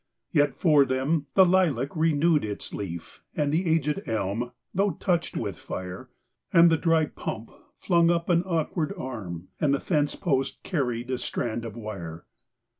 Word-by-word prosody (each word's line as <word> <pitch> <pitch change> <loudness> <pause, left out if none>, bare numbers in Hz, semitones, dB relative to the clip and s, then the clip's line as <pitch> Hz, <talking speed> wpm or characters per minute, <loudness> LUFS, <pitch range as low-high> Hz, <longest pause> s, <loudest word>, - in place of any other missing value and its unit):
Yet 145 0 +3
for 150 -5 +5
them 140 +3 0
the 190 - +8
lilac 165 -8 +2
renewed 160 0 +3
its 105 -1 -4
leaf. 85 -4 -6
And 145 -1 +1
the 170 +4 +1
aged 160 +3 +1
elm, 110 +2 -2 0.2
though 200 0 +2
touched 175 0 -1
with - - -3
fire; 90 0 -6 0.4
And 170 0 +7
the - - +5
dry 165 -1 +3
pump 115 -5 -6 0.3
flung 170 -2 +3
up 170 -1 +1
an 170 -1 +4
awkard 165 -2 -1
arm; 95 -9 -6
And 140 -2 +3
the - - -2
fence 150 -4 0
post 135 -7 -1
carried 125 -7 -2
a 130 - -1
strand 115 -1 -3
of 115 -2 -7
wire. 90 -8 -7
145 Hz, 160 wpm, -26 LUFS, 115-165 Hz, 0.4 s, the